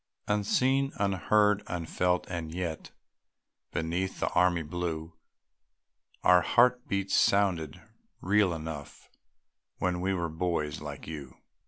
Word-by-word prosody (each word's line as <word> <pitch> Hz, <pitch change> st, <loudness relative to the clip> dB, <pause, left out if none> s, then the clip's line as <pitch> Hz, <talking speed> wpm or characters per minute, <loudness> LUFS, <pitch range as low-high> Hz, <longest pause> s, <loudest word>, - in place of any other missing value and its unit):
Unseen, 130 Hz, +7 st, +2 dB
unheard, 105 Hz, +1 st, +2 dB
unfelt 90 Hz, +1 st, 0 dB
and 85 Hz, -3 st, -4 dB
yet, 85 Hz, -2 st, -4 dB, 0.8 s
Beneath 85 Hz, +4 st, -2 dB
the -, -, 0 dB
army 90 Hz, -1 st, +2 dB
blue 80 Hz, 0 st, -4 dB, 1.1 s
Our 90 Hz, 0 st, +6 dB
heart 125 Hz, +3 st, +3 dB
beats 100 Hz, -1 st, -1 dB
sounded 90 Hz, -7 st, +2 dB, 0.4 s
real 100 Hz, 0 st, +3 dB
enough 80 Hz, -3 st, -7 dB, 0.7 s
When 90 Hz, -1 st, -1 dB
we 95 Hz, +1 st, 0 dB
were 85 Hz, -2 st, -1 dB
boys 80 Hz, -3 st, -2 dB
like 75 Hz, -2 st, -7 dB
you. 75 Hz, -5 st, -8 dB
90 Hz, 110 wpm, -29 LUFS, 80-100 Hz, 1.1 s, Our